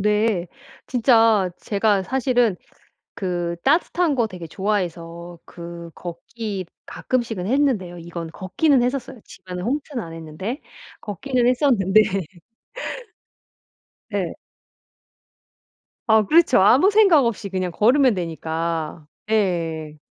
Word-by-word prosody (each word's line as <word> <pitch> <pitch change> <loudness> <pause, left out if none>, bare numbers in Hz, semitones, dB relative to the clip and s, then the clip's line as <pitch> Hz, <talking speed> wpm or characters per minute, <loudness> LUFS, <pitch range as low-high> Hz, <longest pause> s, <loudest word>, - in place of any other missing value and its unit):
네. 210 -3 +1 0.4
진짜 225 -5 +4
제가 205 -1 +1
사실은 245 -2 +1 0.6
그 175 -3 -2
따뜻한 330 +2 +2
거 240 -4 +1
되게 180 -5 -8
좋아해서 175 -2 -3
그 170 -1 -9
걷기 195 +3 -6 0.2
가끔씩은 230 -7 -2
했는데요. 225 -9 0
이건 170 -1 -7
걷기는 250 - +2
했었어요 250 -1 -3
집안에 180 -1 -8
홈트는 265 +4 -3
안 165 -3 -8
했는데. 165 - -6 0.4
걷기는 245 +4 -1
했었는데 240 -6 +4 2.1
네. - - -2 1.7
아 220 -1 +5
그렇죠. 315 - +5
아무 260 - +6
생각 395 -9 +5
없이 230 -3 -2
그냥 185 -1 -2
걸으면 250 +6 +4
되니까. 165 -2 -3 0.2
예. 165 -7 -1
205 Hz, 225 characters per minute, -22 LUFS, 175-245 Hz, 2.1 s, 아무